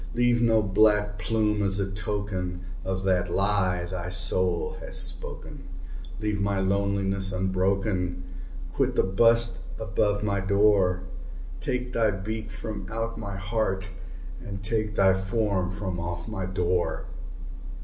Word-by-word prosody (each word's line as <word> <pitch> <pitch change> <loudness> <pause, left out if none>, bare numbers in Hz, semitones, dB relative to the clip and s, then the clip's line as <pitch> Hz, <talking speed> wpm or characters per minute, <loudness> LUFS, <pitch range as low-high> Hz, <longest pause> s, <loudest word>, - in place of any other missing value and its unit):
Leave 120 0 +3
no 115 -2 +4
black 105 +1 +3
plume 105 +2 +1
as 100 0 +1
a 95 -1 -1
token 95 -3 -3 0.2
of 95 0 -2
that 90 -2 +2
lie 95 -2 +2
thy 90 0 -4
soul 90 -1 +1
hath - - -8
spoken! - - -2 0.5
Leave 105 -1 -1
my 100 -1 +1
loneliness 100 0 0
unbroken! 95 -1 0 0.5
quit - - +1
the - - +4
bust 115 +5 +3 0.2
above 105 -1 0
my 100 -1 +1
door! 95 -2 +3 0.6
Take 125 - -2
thy 115 -2 +3
beak 110 +3 -4
from 110 -1 -6
out 115 0 -3
my 100 -3 -5
heart, 100 -2 -1 0.5
and 100 -4 -7
take 110 0 -1
thy 95 -2 +5
form 95 -1 0
from 95 -2 -4
off 85 +1 -4
my 95 -4 -3
door!" 90 -1 0
100 Hz, 130 wpm, -27 LUFS, 95-105 Hz, 0.6 s, thy